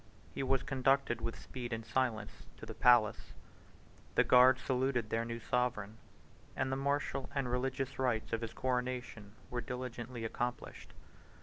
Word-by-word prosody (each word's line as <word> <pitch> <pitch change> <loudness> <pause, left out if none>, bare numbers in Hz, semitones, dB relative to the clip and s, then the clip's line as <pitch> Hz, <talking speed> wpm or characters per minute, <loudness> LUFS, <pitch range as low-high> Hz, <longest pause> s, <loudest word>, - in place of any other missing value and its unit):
He - - -3
was 135 0 +1
conducted 135 -3 +1
with 115 - -4
speed 125 -2 -7
and 115 -1 -3
silence 115 -4 -2
to - - -9
the - - -7
palace; 120 -4 +4 0.8
the - - +6
guards 130 +1 +6
saluted 125 -4 0
their 115 0 +1
new 115 0 -4
sovereign; 110 -3 -1 0.6
and 130 - -1
the - - +1
martial 140 -1 -1
and 135 -2 0
religious 130 +1 -2
rites 120 -5 0
of 115 - 0
his 115 -1 -5
coronation 125 -5 -3 0.2
were 120 0 -2
diligently 125 -1 -5
accomplished. 120 +2 -4
125 Hz, 145 wpm, -34 LUFS, 115-130 Hz, 0.8 s, the